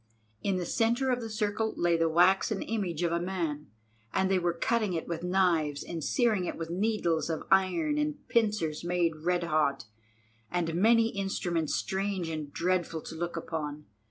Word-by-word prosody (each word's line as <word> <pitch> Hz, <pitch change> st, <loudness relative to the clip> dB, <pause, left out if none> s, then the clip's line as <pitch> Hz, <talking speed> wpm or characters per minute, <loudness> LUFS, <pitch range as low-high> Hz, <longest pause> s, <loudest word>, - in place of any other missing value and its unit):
In 195 Hz, -2 st, 0 dB
the 180 Hz, -, -2 dB
centre 235 Hz, +6 st, +1 dB
of 250 Hz, 0 st, 0 dB
the 225 Hz, -, -5 dB
circle 215 Hz, +1 st, -1 dB
lay 170 Hz, -1 st, +3 dB
the 165 Hz, 0 st, +2 dB
waxen 190 Hz, +5 st, +3 dB
image 185 Hz, -7 st, -2 dB
of 170 Hz, -, +1 dB
a 170 Hz, -, +1 dB
man, 170 Hz, -5 st, -3 dB, 0.4 s
and 190 Hz, 0 st, +1 dB
they 190 Hz, -, +3 dB
were 175 Hz, -1 st, 0 dB
cutting 215 Hz, +2 st, 0 dB
it 165 Hz, -, -3 dB
with 170 Hz, -1 st, -3 dB
knives 175 Hz, -5 st, +1 dB
and 165 Hz, -3 st, -5 dB
searing 220 Hz, -, +2 dB
it -, -, -4 dB
with 165 Hz, 0 st, -5 dB
needles 180 Hz, -4 st, 0 dB
of 160 Hz, -, -2 dB
iron 295 Hz, -, +3 dB
and 300 Hz, -1 st, -2 dB
pincers 210 Hz, -10 st, +1 dB
made 175 Hz, -2 st, +1 dB
red 175 Hz, +2 st, 0 dB
hot, 150 Hz, -5 st, +1 dB, 0.6 s
and 170 Hz, -2 st, -1 dB
many 225 Hz, +5 st, +4 dB
instruments 180 Hz, -6 st, -1 dB
strange 190 Hz, -3 st, -2 dB
and 155 Hz, -3 st, -5 dB
dreadful 170 Hz, -2 st, -1 dB
to -, -, -7 dB
look 170 Hz, +1 st, -3 dB
upon. 150 Hz, -2 st, -4 dB
180 Hz, 175 wpm, -29 LUFS, 165-205 Hz, 0.6 s, many